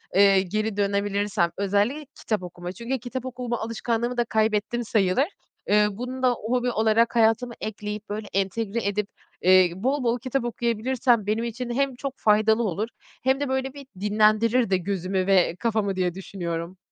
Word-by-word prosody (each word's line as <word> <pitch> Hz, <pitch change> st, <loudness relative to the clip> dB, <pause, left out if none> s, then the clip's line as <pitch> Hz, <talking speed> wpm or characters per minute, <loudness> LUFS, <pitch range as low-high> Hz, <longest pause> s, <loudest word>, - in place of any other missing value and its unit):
eee, 195 Hz, -1 st, +6 dB
geri 215 Hz, +2 st, -2 dB
dönebilirsem, 200 Hz, -2 st, 0 dB
özelli 205 Hz, +9 st, 0 dB
kitap 215 Hz, -4 st, -2 dB
okuma. 175 Hz, 0 st, -7 dB
Çünkü 235 Hz, +6 st, -4 dB
kitap 250 Hz, +1 st, -5 dB
okuma 250 Hz, -2 st, -3 dB
alışkanlığımı 230 Hz, +2 st, -2 dB
da 240 Hz, -, +2 dB
kaybettim 220 Hz, +2 st, 0 dB
sayılır. 210 Hz, +3 st, +2 dB, 0.4 s
Iıı, 210 Hz, -1 st, +3 dB
bunu 255 Hz, +2 st, -5 dB
da 250 Hz, -, +5 dB
hobi 245 Hz, +2 st, -1 dB
olarak 220 Hz, +2 st, +2 dB
hayatıma 230 Hz, +1 st, +3 dB
ekleyip, 210 Hz, 0 st, -5 dB
böyle 210 Hz, 0 st, -4 dB
entegre 200 Hz, +3 st, -1 dB
edip, 205 Hz, 0 st, -1 dB, 0.3 s
eee, 185 Hz, -1 st, +6 dB
bol 260 Hz, +8 st, -1 dB
bol 235 Hz, +1 st, +1 dB
kitap 260 Hz, +1 st, -2 dB
okuyabilirsem, 235 Hz, 0 st, +1 dB
benim 220 Hz, +2 st, 0 dB
için 235 Hz, +1 st, -4 dB
hem 265 Hz, +1 st, 0 dB
çok 275 Hz, +1 st, -5 dB
faydalı 220 Hz, +2 st, +3 dB
olur, 205 Hz, +2 st, -1 dB, 0.4 s
hem 265 Hz, +1 st, +2 dB
de 285 Hz, -2 st, -2 dB
böyle 265 Hz, 0 st, -1 dB
bir 280 Hz, -2 st, -11 dB
dinlendirir 215 Hz, +3 st, +3 dB
de 190 Hz, -, +3 dB
gözümü 185 Hz, 0 st, -2 dB
ve 185 Hz, -3 st, +4 dB
kafamı 215 Hz, -4 st, 0 dB
diye 180 Hz, -2 st, 0 dB
düşünüyorum. 175 Hz, -2 st, -5 dB
220 Hz, 160 wpm, -25 LUFS, 200-240 Hz, 0.4 s, eee